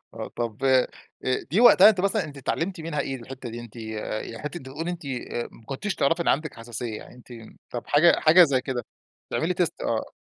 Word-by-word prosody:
آه، -, -, -6 dB
طب، 120 Hz, +2 st, -3 dB
آآ، 130 Hz, -1 st, +4 dB, 0.6 s
دي 185 Hz, +9 st, +3 dB
وقتها 240 Hz, -3 st, +9 dB
أنتِ 205 Hz, -4 st, +3 dB
مثلًا 200 Hz, +1 st, +1 dB
أنتِ 145 Hz, -2 st, -9 dB
اتعلمتِ 165 Hz, +6 st, -2 dB
منها 160 Hz, -2 st, -3 dB
إيه 135 Hz, -, -3 dB
الحتّة 130 Hz, +1 st, -9 dB
دي؟ 120 Hz, +1 st, -6 dB
أنتِ 120 Hz, -1 st, -12 dB
ي 110 Hz, -1 st, -6 dB, 0.4 s
ي 115 Hz, -, -8 dB
حتّة 150 Hz, +4 st, -6 dB
بتقولي 150 Hz, +6 st, -5 dB
أنتِ، 175 Hz, -2 st, -6 dB
آآ، 125 Hz, -2 st, -4 dB
ما 115 Hz, -, -17 dB
كنتيش 140 Hz, -, -3 dB
تعرفي 165 Hz, +5 st, +1 dB
إن -, -, -1 dB
عندك 150 Hz, 0 st, +1 dB
حساسية؟ 115 Hz, -1 st, -5 dB
يعني -, -, -12 dB
أنتِ 125 Hz, 0 st, -17 dB, 0.4 s
طب 120 Hz, -, -5 dB
حاجة 155 Hz, +4 st, +5 dB
حاجة 165 Hz, +3 st, +7 dB
زي 140 Hz, -5 st, +1 dB
كده 130 Hz, -2 st, -4 dB, 0.5 s
تعملي 170 Hz, +3 st, 0 dB
تيست 175 Hz, -1 st, -1 dB
آه. 115 Hz, -1 st, -2 dB
135 Hz, 210 wpm, -25 LUFS, 120-170 Hz, 0.6 s, وقتها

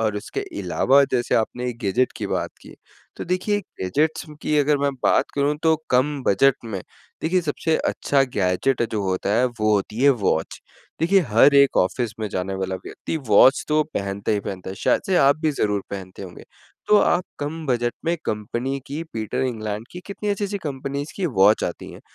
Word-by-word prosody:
और 110 Hz, -2 st, 0 dB
उसके 105 Hz, -, -4 dB, 0.2 s
अलावा 130 Hz, +9 st, +3 dB
जैसे 120 Hz, -1 st, +1 dB
आपने 125 Hz, +2 st, 0 dB
एक 120 Hz, -1 st, -6 dB
गैज़ेट 120 Hz, +4 st, +1 dB
की -, -, -4 dB
बात -, -, -2 dB
की। -, -, -13 dB, 0.4 s
तो -, -, -5 dB
देखिए 185 Hz, +4 st, 0 dB, 0.2 s
गैजेट्स 150 Hz, +15 st, 0 dB, 0.2 s
की 150 Hz, -, +1 dB
अगर 145 Hz, 0 st, +3 dB
मैं 140 Hz, 0 st, +1 dB
बात -, -, +3 dB
करूँ, 145 Hz, +1 st, +1 dB
तो 160 Hz, -1 st, +4 dB, 0.2 s
कम 135 Hz, +2 st, +1 dB
बजट 130 Hz, +8 st, +4 dB
में 105 Hz, -4 st, -4 dB, 0.4 s
देखिए 180 Hz, +3 st, +2 dB
सबसे 160 Hz, 0 st, -1 dB
अच्छा 140 Hz, -1 st, +1 dB
गैज़ेट 100 Hz, +7 st, +1 dB
जो 105 Hz, -2 st, -1 dB
होता 95 Hz, 0 st, -1 dB
है 125 Hz, -, +3 dB, 0.2 s
वो 110 Hz, 0 st, +3 dB
होती 105 Hz, +3 st, -2 dB
है 140 Hz, -, +7 dB
वॉच 80 Hz, -, 0 dB, 0.4 s
देखिए 185 Hz, +4 st, +4 dB
हर 120 Hz, +6 st, +5 dB
एक 140 Hz, -1 st, +5 dB
ऑफ़िस 105 Hz, +5 st, +1 dB
में 110 Hz, -, -2 dB
जाने 95 Hz, 0 st, -3 dB
वाला 95 Hz, 0 st, -3 dB
व्यक्ति -, -, -5 dB
वॉच 110 Hz, +6 st, +6 dB
तो 155 Hz, 0 st, +3 dB
पहनता 100 Hz, +2 st, -2 dB
ही 105 Hz, -, 0 dB
पहनता 95 Hz, -1 st, -6 dB
है, -, -, -6 dB
शायद -, -, +2 dB
से 190 Hz, -2 st, +2 dB
आप 140 Hz, -2 st, +5 dB
भी 155 Hz, -1 st, +1 dB
ज़रूर 105 Hz, -8 st, -1 dB
पहनते 95 Hz, -1 st, -7 dB
होंगे। 90 Hz, -2 st, -10 dB, 0.4 s
तो 210 Hz, -, +6 dB
आप 175 Hz, 0 st, +2 dB
कम 155 Hz, +3 st, -4 dB
बजट 120 Hz, -2 st, 0 dB
में 170 Hz, +1 st, +1 dB
कंपनी 120 Hz, +5 st, -3 dB
की 150 Hz, +3 st, -4 dB
पीटर 110 Hz, +1 st, -2 dB
इंग्लैंड 110 Hz, -3 st, -4 dB
की 180 Hz, -, -7 dB
कितनी 205 Hz, +1 st, -5 dB
अच्छी-अच्छी 200 Hz, 0 st, -2 dB
कंपनीज़ 140 Hz, 0 st, -4 dB
की 190 Hz, -, 0 dB
वॉच 100 Hz, +3 st, +5 dB
आती 85 Hz, -, -5 dB
हैं। -, -, -12 dB
125 Hz, 190 wpm, -22 LUFS, 105-150 Hz, 0.4 s, है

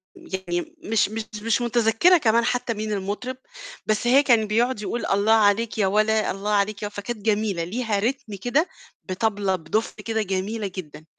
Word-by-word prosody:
يعني 175 Hz, -2 st, -5 dB
مش 215 Hz, -2 st, +2 dB
مش 220 Hz, 0 st, -4 dB, 0.2 s
مش 230 Hz, +1 st, +1 dB
مُتذكِّرة 240 Hz, +9 st, +4 dB
كمان 230 Hz, -4 st, +2 dB
حتّى 245 Hz, -1 st, 0 dB
مين 215 Hz, 0 st, -4 dB
المُطرِب، 210 Hz, +6 st, -3 dB, 0.5 s
بس 215 Hz, +2 st, 0 dB
هي 275 Hz, +4 st, +6 dB
كان 230 Hz, -5 st, +3 dB
بيقعد 230 Hz, +1 st, +1 dB
يقول: 235 Hz, +3 st, -3 dB
"الله 200 Hz, +3 st, +2 dB
عليك 220 Hz, +1 st, +3 dB
يا 200 Hz, -3 st, +2 dB
ولا، 215 Hz, +2 st, +2 dB
الله 200 Hz, +2 st, -3 dB
عليك 205 Hz, 0 st, 0 dB
يا 205 Hz, -, -1 dB
و" -, -, -10 dB
فكانت 210 Hz, +1 st, -5 dB
جميلة 210 Hz, -5 st, +1 dB
ليها 215 Hz, +3 st, -1 dB
ريتم 225 Hz, -1 st, -2 dB
كده 280 Hz, -, +2 dB, 0.4 s
بطبلة 200 Hz, 0 st, 0 dB
بدُف 185 Hz, +6 st, -2 dB
كده 220 Hz, -1 st, -2 dB
جميلة 200 Hz, +2 st, -2 dB
جدًا، 155 Hz, -4 st, -8 dB
215 Hz, 170 wpm, -24 LUFS, 200-230 Hz, 0.5 s, هي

